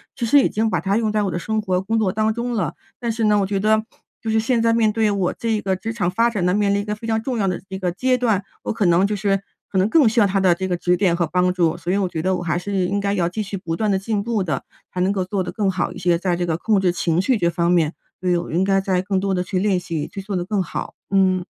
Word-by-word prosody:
其 235 - -2
实 285 +5 +6
已 - - +4
经 220 +1 0
把 - - 0
它 195 +2 0
用 220 -2 0
在 210 0 +1
我 195 - -1
的 175 - -2
生 220 +5 -1
活、 185 -3 0
工 220 +4 -1
作 210 -4 +1
当 215 +1 +1
中 240 +2 -3
了。 190 -10 -1 0.2
但 235 -1 -1
是 225 0 -2
呢， 210 -1 +4
我 195 - 0
觉 200 0 -1
得 215 +2 +2 0.4
就 225 - -4
是 220 0 +2
现 235 +1 +1
在 230 0 +3
面 225 -2 +3
对 220 -1 +2
我 195 -3 0
这 230 - -3
一 215 - +1
个 190 -1 0
职 215 +5 -5
场 200 -6 -1
发 230 +5 +2
展 205 -6 -2
呢， 180 - +2
面 205 0 +2
临 200 - +1
一 - - -5
个 210 - -2
非 225 +2 -8
常 220 0 +1
重 245 -2 -2
要 195 - +1
的 180 - -1
一 190 0 -5
个 180 -2 -1
阶 255 +8 +1
段， 220 -5 +1 0.2
我 - - -1
可 220 -2 0
能 175 +3 +4
就 210 - -1
是 195 -1 0 0.3
可 190 - -1
能 190 +3 +3
更 295 -1 +5
需 225 +2 +2
要 - - +6
他 195 0 0
的 185 -2 +4
这 190 - -3
个 180 -1 -1
指 180 +1 +2
点 185 -2 +2
和 170 -1 0
帮 180 +1 +1
助， 170 -3 +1
所 170 +1 -3
以 195 - +2
我 195 -2 +1
觉 160 - -3
得 185 +3 +1
我 - - -5
还 170 0 0
是 200 +3 -5
应 195 +3 -1
该 200 0 0
要 180 -4 +1
继 215 +4 -3
续 200 0 -5
不 165 -3 -4
断 215 +2 0
地 190 - +1
进 205 0 -2
步 230 -2 -1
的， 155 -7 -2 0.3
才 180 - -2
能 185 +2 +2
够 190 -2 -1
做 190 0 -1
得 - - -5
更 205 -3 0
好 185 -1 -1
一 - - -10
些， 175 -1 +2
在 180 0 0
这 175 - -1
个 165 -2 -1
控 210 +3 +2
制 185 - +2
情 170 -1 +1
绪 240 +5 +2
这 170 -4 +1
方 170 0 0
面 165 -3 +2 0.3
觉 180 -1 0
得 175 -1 +2
我 - - -9
应 175 +4 +1
该 195 0 +3
再 190 -2 0
更 190 0 -1
多 195 0 -1
地 180 -1 0
去 185 0 -2
练 195 -1 +2
习， 165 -4 -4
去 195 - -7
做 195 0 -4
得 175 - -2
更 200 0 0
好。 - - -6 0.2
嗯。 185 -2 +3
195 Hz, 350 characters per minute, -21 LUFS, 180-215 Hz, 0.4 s, 实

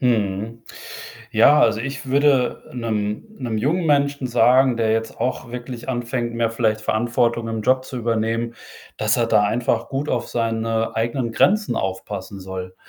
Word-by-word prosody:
Mhm. 110 -1 0 0.7
Ja, 140 +7 +6
also, 110 -1 +3
ich 135 +3 -5
würde, 135 -1 +2
'nem 110 - -2
'nem 115 -4 -2
jungen 160 +10 0
Menschen 140 -2 +2
sagen, 125 +1 +4
der 110 -1 +1
jetzt 115 0 -2
auch 125 -2 -2
wirklich 125 0 -7
anfängt, 120 -1 -2
mehr 115 -1 0
vielleicht 110 -2 0
Verantwortung 115 +1 0
im 110 -1 -3
Job 130 +3 +2
zu 130 - -6
übernehmen, 115 0 -1 0.4
dass 110 +1 +1
er 120 - +2
da 105 - +4
einfach 115 +2 0
gut 140 +2 -2
auf - - -1
seine 115 -1 -1
eigenen 115 +1 -1
Grenzen 210 - +2
aufpassen 95 +2 -4
soll. 95 -1 -7
115 Hz, 155 wpm, -22 LUFS, 110-130 Hz, 0.7 s, Ja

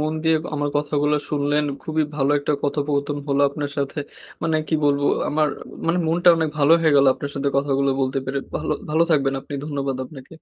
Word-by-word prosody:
মন 155 +1 0
দিয়ে 160 0 +3 0.2
আমার 145 0 -1
কথাগুলো 150 0 +1
শুনলেন, 145 0 +1 0.2
খুবই 155 0 0
ভালো 140 0 +1
একটা 145 +1 -1
কথোপকথন 145 0 -1
হলো 140 0 +2
আপনার 145 0 -4
সাথে। 140 +2 -2 0.4
মানে 160 -1 +1
কি 160 - +1
বলবো, 145 0 +2 0.2
আমার 155 0 +2 0.4
মানে 170 +2 +2
মনটা 175 +2 +3
অনেক 160 -1 0
ভালো 145 +2 +5
হয়ে 155 -3 +3
গেলো 140 -1 +6
আপনার 140 - -6
সাথে 140 0 0
কথাগুলো 140 0 +1
বলতে 130 +1 0
পেরে 140 +1 -2 0.2
ভালো - - -2 0.2
ভালো 160 +2 +3
থাকবেন 135 -3 +2
আপনি 145 - -9
ধন্যবাদ 140 -3 -2
আপনাকে। 135 +1 -12
145 Hz, 190 wpm, -22 LUFS, 140-155 Hz, 0.4 s, গেলো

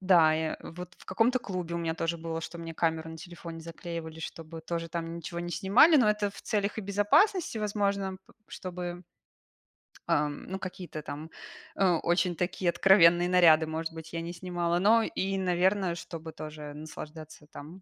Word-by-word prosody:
Да, 175 -4 +5
я 160 0 -1
вот 180 +1 -9
в - - -16
каком-то 230 +7 +2
клубе 180 -6 -4
у - - -1
меня 165 -1 -1
тоже 165 +1 -1
было, 165 0 -4
что 170 +1 -7
мне 165 -1 -7
камеру 160 -1 0
на 160 - -8
телефоне 170 -1 -9
заклеивали, 165 -1 -7
чтобы 165 0 -7
тоже 165 0 -4
там 165 0 -4
ничего 170 +1 -6
не 175 - -4
снимали, 230 - +6
но 220 -6 +5
это 210 -1 0
в - - -12
целях 205 -2 -1
и - - 0
безопасности, 215 - +2
возможно, 200 -2 -1
п - - -20 0.2
чтобы 180 -1 -6 1.0
ам, 145 0 0
ну 190 0 -4
какие-то 180 -4 -6
там, 150 +2 -7 0.5
э, 195 - +3 0.2
очень 175 0 +2
такие 180 0 -1
откровенные 175 -1 +6
наряды, 165 -3 +6
может 160 +1 -3
быть, 160 0 -10
я 165 - -2
не 170 +1 -5
снимала. 175 -1 -1
Но 225 +4 +5
и, 195 -2 -2
наверно, 185 0 +2
чтобы 165 -1 -7
тоже 150 -1 -8
наслаждаться 155 0 -9
там 160 +6 -11
170 Hz, 175 wpm, -29 LUFS, 160-190 Hz, 1.0 s, снимали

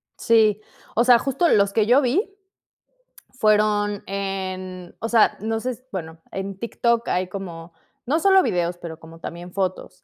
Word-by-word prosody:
Sí. 215 -2 +3 0.3
O 235 - +4
sea, 245 -1 +7
justo 275 +8 +1
los 200 -1 +3
que 215 0 +3
yo 250 +5 +5
vi 370 - 0 1.1
fueron 210 -1 +2
en, 185 -2 -5
o 225 - -3
sea, 230 -2 +4
no 225 +1 -1
sé 255 +3 -2
s 255 +1 -11
bueno, 160 -4 -6
en 195 0 -5
TikTok 235 +1 0
hay 180 +1 0
como, 175 -3 -7 0.4
no 300 +6 +2
solo 385 +2 +5
videos, 175 - -1
pero 165 -2 -8
como 165 0 -13
también 175 +1 -8
fotos. 185 -1 -3
200 Hz, 160 wpm, -23 LUFS, 185-235 Hz, 1.1 s, sea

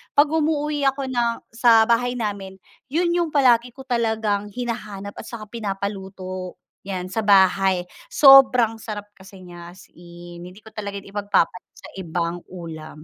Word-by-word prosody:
pag 290 +1 +5
umuuwi 300 -2 0
ako 270 0 -5
ng 240 -1 +1 0.2
sa 225 -1 +5
bahay 245 +1 +1
namin 200 -4 -4 0.3
yun 340 +4 +1
yung 345 -1 +1
palagi 245 -3 +3
ko 265 - -10
talagang 220 -4 0
hinahanap 215 -4 -5
at - - -8
saka 230 -3 -8
pinapaluto, 195 -3 -5 0.3
yan 185 -1 -5
sa 225 - -2
bahay, 190 -2 +4 0.3
sobrang 260 - +6
sarap 205 -2 -7
kasi 190 -1 -14
niya 175 -1 -11
as 190 - -15
in, 175 0 -12
hindi 190 +4 -14
ko 220 - -13
talaga 200 -1 -5
yan 195 - -14
ipag-papalit 205 -3 -1
sa - - -12
ibang 170 0 -3
ulam. 160 -4 -9
205 Hz, 150 wpm, -22 LUFS, 185-245 Hz, 0.3 s, sobrang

